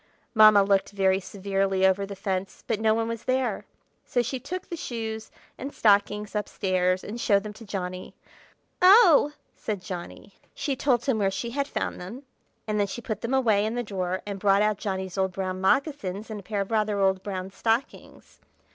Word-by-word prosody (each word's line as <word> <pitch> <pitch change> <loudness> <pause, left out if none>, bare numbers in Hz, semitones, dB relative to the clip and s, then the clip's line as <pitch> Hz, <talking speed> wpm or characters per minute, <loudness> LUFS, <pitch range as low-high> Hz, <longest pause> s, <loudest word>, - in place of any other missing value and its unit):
Mamma 215 -3 +7
looked 195 0 +1
very 190 -1 +2
severely 195 0 0
over 190 +1 +2
the 200 - -7
fence, 195 -1 -4
but 220 -3 -1
no 220 0 +3
one 225 0 -1
was 230 -1 -5
there; 255 -4 0 0.4
so 245 - 0
she 255 +2 -3
took 355 +8 -6
the 345 - -5
shoes 225 -7 -5 0.3
and 275 - -5
stockings 210 -1 +2
up 210 - -2
stairs 185 -1 0
and 230 +3 -6
showed 200 -2 +3
them 210 -1 -7
to 225 - -13
Johnny. 185 -2 -5 0.7
"Oh!" 365 -7 +7 0.2
said 210 -3 -4
Johnny. 180 -4 -8 0.2
She 280 -3 -2
told 250 -3 +1
him 260 -5 +1
where 195 -2 +2
she 195 +5 -4
had 280 +2 -1
found - - -3
them; 225 +10 -8 0.4
and 215 -1 -1
then 200 - +2
she 195 - -6
put 220 -3 -5
them 240 +3 -1
away 220 -6 +3
in 220 +2 -2
the 245 - -1
drawer, 185 -3 -3
and 200 -1 -5
brought 200 +1 +4
out 210 -1 +1
Johnny's 190 -1 -3
old 190 -1 0
brown 185 0 -3
moccasins 215 - 0
and 215 - -5
a - - -12
pair 205 0 -2
of 195 - -5
rather 215 -2 +1
old 190 -1 +2
brown 190 -1 -5
stockings. 225 +6 -3
205 Hz, 195 wpm, -26 LUFS, 195-230 Hz, 0.7 s, Mamma